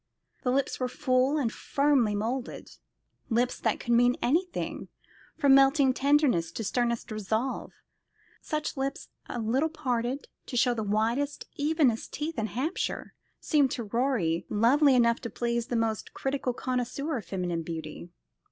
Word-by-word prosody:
The 250 - -1
lips 270 +2 0
were 255 - 0
full 260 +1 +1
and 245 -6 0
firmly 275 -7 +2
moulded 235 +5 -3 0.6
lips 245 +1 +1
that - - 0
could 240 - -1
mean 245 +1 +4
anything, 345 +8 -1 0.5
from 285 -4 +5
melting 270 0 +5
tenderness 275 - +2
to 225 - -4
sternest 235 +1 -1
resolve. 220 +5 -2 0.7
Such 305 -1 -3
lips, 275 +1 -3 0.2
a - - -4
little 255 +8 +1
parted 260 -4 -2 0.2
to 245 - -3
show 245 +1 +4
the 225 - -3
whitest, 225 +7 0
evenest 290 -6 +1
teeth 305 0 -3
in 220 - -1
Hampshire, 275 - -3 0.3
seemed 290 -4 +2
to 235 - -3
Rorie 215 -7 0
lovely 260 +6 +4
enough 235 -1 +3
to 235 - -5
please 235 0 -2
the 245 - -2
most 225 -2 -1
critical 270 -1 -1
connoisseur 255 +4 -2
of 220 - -7
feminine 180 -3 -2
beauty. 165 0 -7
250 Hz, 145 wpm, -28 LUFS, 230-280 Hz, 0.7 s, from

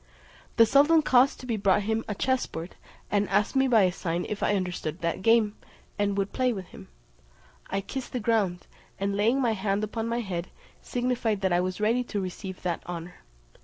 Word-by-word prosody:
The 230 - +8
sultan 295 +6 +5
caused 260 0 +4
to - - -9
be 230 -3 -1
brought 195 -2 +3
to - - -6
him 220 +1 0
a 210 - -3
chessboard, 195 -9 -2 0.4
and 205 0 +1
asked 210 - +1
me 265 0 +4
by 225 -5 +5
a 185 - +3
sign 175 -1 -3
if 210 - -4
I 205 - +2
understood 180 -3 -3
that 170 +2 -1
game, 225 0 +3 0.4
and 200 -1 +1
would 195 0 -1
play 255 -1 +2
with 190 -5 -5
him? - - -12 0.8
I 195 +1 -1
kissed 260 +5 -6
the 250 - -2
ground, 210 -6 0 0.3
and 200 0 -1
laying 225 +6 +2
my 245 -4 +2
hand 200 0 -1
upon 225 +2 -3
my 235 +1 -1
head, 180 -4 -4 0.3
signified 245 -4 -1
that 190 -2 +1
I 175 - +3
was 185 +1 -3
ready 230 +4 +2
to 210 - -3
receive 185 0 -6
that 175 -2 -1
honour. 175 0 -6
205 Hz, 200 wpm, -27 LUFS, 185-235 Hz, 0.8 s, The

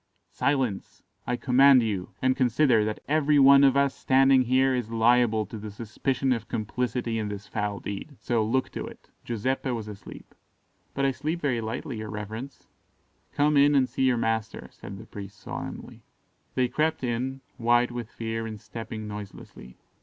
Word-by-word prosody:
"Silence! 130 -8 -1 0.2
I 125 - +1
command 130 0 +5
you; 100 -5 -2
and 130 0 +3
consider 125 -2 +3
that 110 0 -3
every 150 0 +3
one 140 0 +7
of 135 0 +5
us 140 -1 +3
standing 135 0 +4
here 130 +2 +3
is 125 -3 -2
liable 115 -1 +3
to 110 - -8
the 105 +1 -7
suspicion 125 +5 -1
of 115 -2 -5
complicity 120 +1 -2
in 105 - -2
this 105 0 -6
foul 105 -2 -3
deed; 100 +9 -7
so 115 -3 0
look 130 +4 0
to - - -5
it. - - -14
Giuseppe 130 +4 -2
was 115 -4 -3
asleep." 105 -2 -11 0.6
"But 140 - +1
I 135 - +3
sleep 155 +6 -3
very 130 -7 0
lightly, 110 +2 -4
your 110 0 -6
reverence." 110 +5 -7 0.7
"Come 150 +1 +2
in 145 +1 +5
and 130 -2 +4
see - - -5
your 125 -2 +3
master," 115 -1 -2
said 100 - -10
the - - -11
priest 100 0 -10
solemnly. - - -7 0.5
They 130 -1 +2
crept 155 +4 -1
in, 130 +2 -2 0.2
white 120 0 +3
with 120 -2 -6
fear 115 0 -4
and 110 -1 -7
stepping 110 0 -7
noiselessly. 100 -11 -10
120 Hz, 170 wpm, -26 LUFS, 110-135 Hz, 0.7 s, one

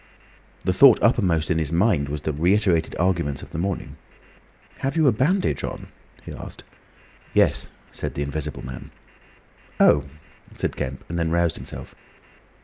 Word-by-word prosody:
The 90 - +2
thought 125 +4 +7
uppermost 90 -9 +2
in 80 - +2
his 80 -1 -2
mind 85 -5 +2
was 75 0 -4
the 75 - -1
reiterated 85 +1 +2
arguments 85 -6 0
of - - -12
the 80 - -4
morning. 95 0 -3 0.8
"Have 135 +4 -2
you 160 - +4
a 135 - +6
bandage 155 - +1
on?" - - -6 0.3
he - - -8
asked. - - -10 0.7
"Yes," - - +3 0.2
said - - -5
the 70 - -1
Invisible 75 0 -5
Man. 65 0 -8 0.9
"Oh!" 75 -1 +5 0.5
said - - -2
Kemp, 65 0 -5
and 85 +1 -3
then 85 -1 0
roused 85 0 +1
himself. - - -9
85 Hz, 150 wpm, -23 LUFS, 75-100 Hz, 0.9 s, thought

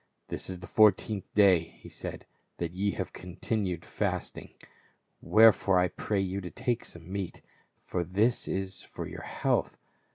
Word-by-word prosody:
"This - - -5
is 95 - -4
the 90 - -9
fourteenth 105 +1 +3
day," 100 -4 +7
he 85 0 -12
said, - - -7 0.3
"that 85 -1 -2
ye 100 +3 0
have 95 -2 -4
continued 90 -1 -3
fasting. - - -3 0.7
Wherefore 110 -3 +6
I 90 0 +3
pray 100 +3 -2
you 95 +1 -2
to 90 - -6
take 120 +8 -1
some 85 +1 -9
meat; 95 -3 -4 0.4
for 90 - -1
this 105 +8 +1
is 95 0 -3
for - - -7
your - - -8
health. - - 0
95 Hz, 155 wpm, -29 LUFS, 90-105 Hz, 0.7 s, day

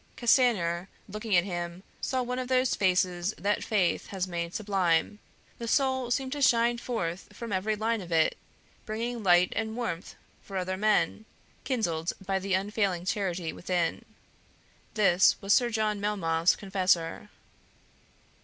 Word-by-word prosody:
Castanier, 200 -8 +2 0.2
looking 210 0 -2
at 175 - +5
him, 175 -1 -5 0.2
saw 260 -1 -1
one 250 +1 -3
of 255 - -3
those 255 0 +2
faces 180 0 +1
that 205 +4 0
faith 195 -5 0
has 190 -2 -3
made 170 -1 -4
sublime; 195 -2 +1 0.4
the 235 - -5
soul 260 -1 +1
seemed 260 +1 -1
to 290 +1 -3
shine 235 -2 +3
forth 185 -8 -3
from 230 -3 -6
every 205 +3 0
line 220 +1 -1
of 175 -2 -10
it, 160 -1 +3 0.5
bringing 230 +2 -3
light 180 -2 +4
and 220 0 -2
warmth 185 -8 -4 0.3
for 195 - -7
other 185 0 -2
men, 215 +2 +1 0.4
kindled 175 - -1
by 195 0 0
the 190 0 0
unfailing 195 -2 -1
charity 185 -4 -2
within. 175 -2 -1 0.9
This 195 -3 +4
was 200 0 +2
Sir 245 -2 +4
John 215 -2 -1
Melmoth's 170 -5 +2
confessor. 190 -1 0
200 Hz, 145 wpm, -28 LUFS, 180-230 Hz, 0.9 s, at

